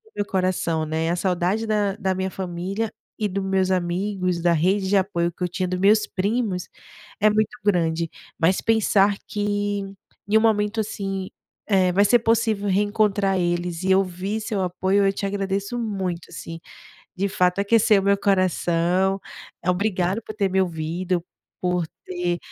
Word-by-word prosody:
meu 205 - -1
coração, 185 -4 0
né. 160 +1 -1
A 175 - +1
saudade 185 +4 0
da 205 -2 0
da 190 -2 -1
minha 190 0 -2
família 190 +4 -3 0.3
e 215 - 0
do 195 +1 -3
meus 190 -1 +1
amigos, 185 0 -1
da 170 0 +3
rede 190 +4 +1
de 200 - +3
apoio 175 -3 0
que 180 - -7
eu - - +2
tinha, 185 +1 -2
dos 180 0 -2
meus 210 +3 +4
primos, 200 -2 -1 0.5
é 215 0 +5
muito 215 +3 0
grande. 165 -4 +1 0.3
Mas 180 +3 +3
pensar 205 -3 +3
que 205 0 -1 0.5
em 220 - +5
um - - +5
momento 215 0 +2
assim, 195 -3 -3 0.4
eh, 190 -3 +3
vai 200 +3 +4
ser 240 +3 +5
possível 225 -3 +1
reencontrar 205 -1 +2
eles 175 0 -1
e 190 0 +3
ouvir 190 +3 0
seu 210 -2 -2
apoio, 190 +2 +1
eu 195 - +4
te 200 - -4
agradeço 200 +3 -2
muito 190 -7 -3
assim. 165 0 -8 0.6
De 195 +2 0
fato 180 -1 +1
aqueceu 210 0 +4
o - - -4
meu 200 0 +4
coração, 185 -1 +1 0.4
eh, 175 - 0
obrigado 185 +2 0
por 215 - -8
ter 200 -2 +1
me 190 +1 +2
ouvido, 175 +1 -2 0.4
por 180 -2 0 0.2
ter 175 -1 -2
190 Hz, 165 wpm, -23 LUFS, 180-205 Hz, 0.6 s, é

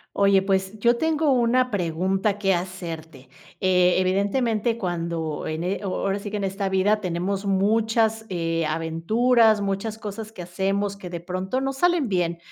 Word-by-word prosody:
Oye, 200 -1 +4
pues, 190 +1 0
yo 235 +3 +3
tengo 315 0 +1
una 250 0 +2
pregunta 190 +3 0
que 195 -2 +2
hacerte, 165 -6 -6 0.4
eh, 180 -1 +4
evidentemente, 210 +5 +1
cuando 170 -5 -3
en 155 +1 -3
eh 185 +3 -1
o - - -3
ahora 195 +1 -1
sí 205 - -6
que 210 - -3
en 200 - -3
esta 195 0 -2
vida 200 +3 +2
tenemos 190 +2 -2
muchas, 220 +3 +2
eh, 165 -2 -1
aventuras, 215 +9 +2
muchas 200 +2 -2
cosas 215 0 -7
que 180 -5 -8
hacemos 195 +3 -1
que 185 -3 -8
de 175 -1 -5
pronto, 185 +8 -3
no 270 0 -1
salen 340 -2 +1
bien, 175 -3 0
195 Hz, 165 wpm, -24 LUFS, 180-220 Hz, 0.4 s, Oye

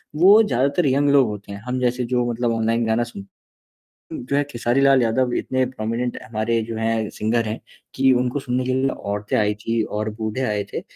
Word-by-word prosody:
वो 195 +7 +7
ज़्यादातर 140 - +1
यंग 140 +2 +2
लोग 140 -3 +5
होते 105 -1 -7
हैं। 100 - -7
हम 125 +1 -1
जैसे 125 0 0
जो 120 0 0
मतलब 120 0 -1
ऑनलाइन 115 +1 0
गाना 110 +1 +1
सुन 100 -4 -9 0.9
उम, - - -5
जो 140 - 0
है 145 - +3
खेसारी 120 +1 0
लाल 135 -2 +5
यादव 120 +2 +1
इतने 130 0 0
प्रोमिनेंट 120 0 -3
हमारे 115 +1 -1
जो 115 0 -6
हैं 110 -1 -1
सिंगर 115 +2 0
हैं, 110 - -4 0.3
कि 135 0 +4
उनको 125 +2 0
सुनने 125 0 -2
के 130 - -1
लिए 130 +1 +1 0.2
औरतें 105 0 -2
आई 105 -1 +2
थी 115 +2 -1
और 110 +1 -3
बूढ़े 110 +3 -3
आए 105 -4 -1
थे। - - -4
120 Hz, 210 wpm, -22 LUFS, 110-130 Hz, 0.9 s, वो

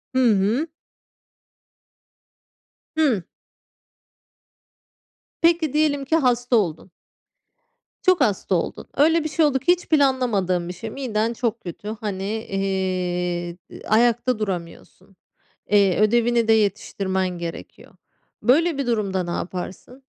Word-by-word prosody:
Hı - - +3
hı. 215 +11 +1 2.3
Hı. 260 - +2 2.2
Peki, 330 -3 +3
diyelim 295 -2 +1
ki 320 - +1
hasta 245 -4 +2
oldun. 180 -3 -1 1.1
Çok 370 -2 +3
hasta 200 -3 +1
oldun. 170 - -3
Öyle 320 +3 +4
bir 310 - -3
şey 315 +1 +2
oldu 275 -3 +2
ki, 350 - +3
hiç 360 0 0
planlamadığın 235 - +2
bir - - -4
şey. 225 +5 -7
Miden 230 -2 -2
çok 230 -1 -2
kötü. 180 +3 -8
Hani, 195 -3 -3
eee, 185 -4 -2 0.3
ayakta 240 +2 +2
duramıyorsun. 185 0 -6 0.5
Eee, 200 -3 +4
ödevini 235 +1 +3
de 225 - +5
yetiştirmen 195 -3 0
gerekiyor. 170 -1 -8 0.5
Böyle 315 +5 +3
bir 275 -3 -2
durumda 200 -5 0
ne 175 - -5
yaparsın? 185 +9 -6
220 Hz, 110 wpm, -22 LUFS, 190-265 Hz, 2.3 s, de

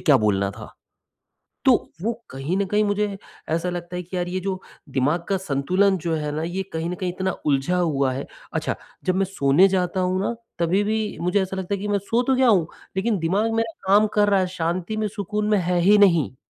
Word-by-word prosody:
क्या 145 -4 +5
बोलना 100 -1 +2
था, 100 - -11 0.9
तो - - +7 0.3
वो 230 +2 +1 0.2
कहीं 135 +8 -3
न 200 - +2
कहीं 210 +3 +2
मुझे 205 0 0 0.3
ऐसा 170 +3 0
लगता 175 0 -5
है 180 - -3
कि 180 +2 -7
यार 175 0 -1
ये 185 +1 -2
जो 190 0 -3 0.3
दिमाग 145 +6 0
का 195 - +2
संतुलन 185 +4 +1
जो 165 -1 0
है 150 -1 -2
ना, 155 - -2
ये 175 +4 -2
कहीं 160 +1 -2
न - - -2
कहीं 180 -1 -3
इतना 190 +1 -1 0.2
उलझा 145 +5 +2
हुआ 140 -7 +1
है 135 - -4 0.3
अच्छा, - - -1 0.3
जब 185 - +1
मैं 195 +1 +2
सोने 180 0 +4
जाता 185 -1 0
हूँ 185 +1 0
ना, 235 +4 -1 0.2
तभी-भी 205 +5 0
मुझे 180 +3 +2
ऐसा 190 0 -4
लगता 190 +1 -2
है 195 - -4
कि 210 - -3
मैं 205 0 +2
सो 225 +5 0
तो 260 +1 +2
गया 255 -1 +4
हूँ, 185 -8 +4 0.3
लेकिन 210 +1 +1
दिमाग 200 +7 +1
मेरा 225 0 0 0.2
काम 205 +2 +6
कर 205 -1 +4
रहा 200 -2 +4
है, 185 - +1
शांति 180 +3 -2
में, 215 -1 0
सुकून 210 +1 -3
में 210 -1 +3
है 180 0 0
ही 205 +4 +5
नहीं। 170 -10 +4
185 Hz, 225 wpm, -23 LUFS, 170-205 Hz, 0.9 s, तो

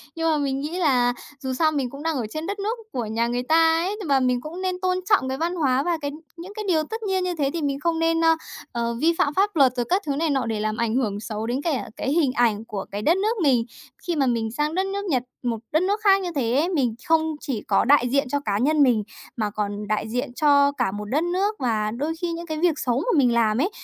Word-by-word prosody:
Nhưng 325 -1 +1
mà 305 - +2
mình 275 -2 -1
nghĩ 305 +5 -4
là 250 -7 +3 0.3
dù 265 -1 -3
sao 310 +4 +2
mình 275 -4 -1
cũng 280 +3 -9
đang 325 -1 0
ở 235 - -2
trên 310 +6 -5
đất 405 0 -4
nước 435 +4 -2
của 240 -3 -3
nhà 225 +2 0
người 245 +1 -2
ta 325 +3 +4
ấy, 405 +2 -2
nhưng 375 - -6
mà 275 -1 +4
mình 250 -1 +1
cũng 335 +6 -7
nên 370 -1 -2
tôn 365 0 +1
trọng 260 -11 +3
cái 265 - -2
văn 345 +2 -1
hóa 270 -4 +1
và 345 -2 0
cái 285 0 -3 0.3
những 365 +4 -9
cái 430 - -4
điều 315 -4 +2
tất 445 +7 -6
nhiên 380 -3 0
như 360 -1 -2
thế 275 -2 +1
thì 335 - -2
mình 280 -1 -1
không 325 +1 0
nên, 330 0 +2
ơ, 325 0 +5 0.4
ờ, 235 0 -2
vi 330 +2 +4
phạm 285 - +1
pháp 400 +1 +1
luật 265 -4 +5
rồi 245 -1 -1
các 370 +3 +2
thứ 280 - -1
này 315 +2 0
nọ 265 -4 0
để 220 -2 -2
làm 215 +1 -2
ảnh 235 -1 0
hưởng 210 -6 0
xấu 215 0 -4
đến 255 +4 -1
cả 300 -6 -2
cái 270 - -2
hình 300 -5 +2
ảnh 225 -3 +1
của 200 -4 -5
cái 205 - -4
đất 330 - +3
nước 435 +4 0
mình. 250 -5 +3 0.4
Khi 345 - 0
mà 280 -3 +2
mình 230 -3 0
sang 300 +6 -1
đất 380 +1 +1
nước 400 +1 -3
Nhật, 260 -9 0 0.2
một 235 -2 -1
đất 315 +4 +2
nước 405 +3 0
khác 390 -2 +5
như 360 - -3
thế 235 -4 0
ấy, 305 +7 +2
mình 255 -10 0
không 325 -1 +4 0.2
chỉ 255 -8 -3
có - - +3
đại 250 -2 +4
diện 275 +1 +1
cho 285 - 0
cá 200 -1 0
nhân 290 +5 +3
mình 235 -5 +3 0.3
mà 215 -2 0
còn 205 0 -4
đại 215 0 -1
diện 245 +1 -3
cho 285 0 +4
cả 195 -9 -1
một 210 +1 -5
đất 290 +10 0
nước. 385 +5 0
Và 215 -4 0
đôi 290 +7 -2
khi 345 -1 -1
những 340 +1 -5
cái 315 -2 -4
việc 325 -3 +2
xấu 250 -2 0
mà 345 0 0
mình 250 -4 +4
làm 225 -2 +2
ấy, 340 +9 +1
285 Hz, 280 wpm, -24 LUFS, 240-335 Hz, 0.4 s, ơ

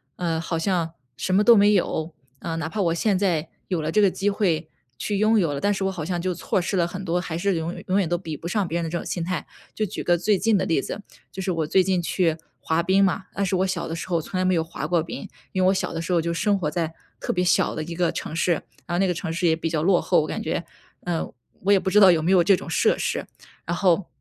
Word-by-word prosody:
嗯， 165 -2 -1
好 165 0 -2
像 165 -1 0 0.2
什 185 - -1
么 205 - +5
都 235 0 +8
没 205 +1 +5
有。 165 -4 0 0.3
嗯， 165 0 -4
哪 160 - -2
怕 205 +4 -2
我 165 -2 +2
现 190 +2 +1
在 170 -5 0 0.2
有 180 -4 -1
了 155 +1 -2
这 210 - +3
个 200 - +5
机 200 +2 -1
会 170 -6 0 0.3
去 205 - -2
拥 215 +2 +4
有 165 -6 +1
了， 140 - -3
但 205 - +2
是 195 - -3
我 190 - +1
好 175 -5 -5
像 175 0 -2
就 185 0 -1
错 180 - -1
失 190 +2 -2
了 170 -1 +2
很 185 +2 -6
多， 175 +1 0
还 165 -2 -4
是 195 +1 +1
永 165 +2 -3
永 190 +2 +2
远 185 - +1
都 175 - +1
比 165 -3 -6
不 170 - -7
上 200 +3 0
别 170 +1 -2
人 170 - -1
的 160 - -3
这 175 - -2
种 - - -6
心 175 - -3
态。 180 -1 -3 0.3
就 215 - 0
举 195 - -5
个 175 0 +2
最 195 +3 +2
近 225 -2 +3
的 185 - 0
例 165 -6 +1
子， 205 - -6 0.3
就 190 - -6
是 185 - -1
我 165 -3 -1
最 185 +4 +4
近 185 -1 +1
去 170 -2 +1 0.2
滑 160 +1 0
冰 190 +3 +3
嘛， 190 0 +1
但 200 - -1
是 190 0 0
我 190 - +1
小 185 -2 -2
的 165 - -3
时 170 - -6
候 170 -2 +1
从 185 - -5
来 185 - +1
没 185 -1 +3
有 165 - +1
滑 160 -2 -5
过 170 -1 +2
冰。 160 - -7 0.2
因 185 - -1
为 185 - +4
我 190 - +5
小 185 - -2
的 165 - -3
时 170 - -4
候 170 - +4
就 170 +1 -1
生 200 +4 +1
活 155 -6 -2
在， 165 -2 -2 0.3
特 - - -2
别 180 - 0
小 180 - +2
的 155 - -3
一 170 +2 -6
个 175 -1 +1
城 - - -5
市， 170 +1 +2 0.3
然 175 - -2
后 - - +1
那 195 - +3
个 180 - +1
城 160 0 -4
市 175 +2 -1
也 160 - +4
比 165 0 -3
较 155 -1 -1
落 185 -1 +4
后， 180 - +3
我 - - -2
感 - - -3
觉。 165 +2 -2 0.4
嗯， 170 -2 -2 0.3
我 200 - +4
也 200 - +6
不 190 - -2
知 210 - +6
道 195 -3 +8
有 160 -3 +3
没 180 - +2
有 180 -2 +6
这 195 +2 +5
种 - - -9
设 160 - +2
施。 - - -2 0.4
然 170 +1 -1
后， 185 -1 +2
175 Hz, 320 characters per minute, -24 LUFS, 165-190 Hz, 0.4 s, 都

